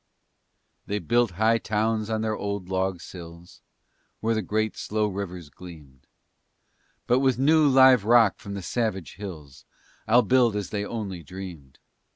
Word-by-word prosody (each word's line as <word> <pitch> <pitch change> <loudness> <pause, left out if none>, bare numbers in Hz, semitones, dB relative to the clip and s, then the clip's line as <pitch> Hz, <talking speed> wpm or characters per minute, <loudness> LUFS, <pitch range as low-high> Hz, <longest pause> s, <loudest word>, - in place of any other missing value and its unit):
They 105 - -1
built 120 +2 +1
high 110 +4 +2
towns 110 +1 -1
on 110 -1 -1
their 110 -1 -1
old 100 -3 -4
log 95 -1 -1
sills, 85 -1 -12 0.6
Where 115 +1 0
the 110 - 0
great, 110 +3 -1
slow 110 0 -1
rivers 90 -6 -5
gleamed, 75 -8 -14 1.0
But 125 +1 +3
with 130 -2 +2
new, 150 +3 +4
live 130 -4 +6
rock 115 -2 +4
from 100 -1 -7
the 100 - -6
savage 95 - -3
hills 75 -10 -9 0.4
I'll 120 +3 +5
build 120 0 +3
as 105 -2 -4
they 100 -1 -2
only 100 -5 -5
dreamed. 85 -5 -10
105 Hz, 150 wpm, -25 LUFS, 90-115 Hz, 1.0 s, live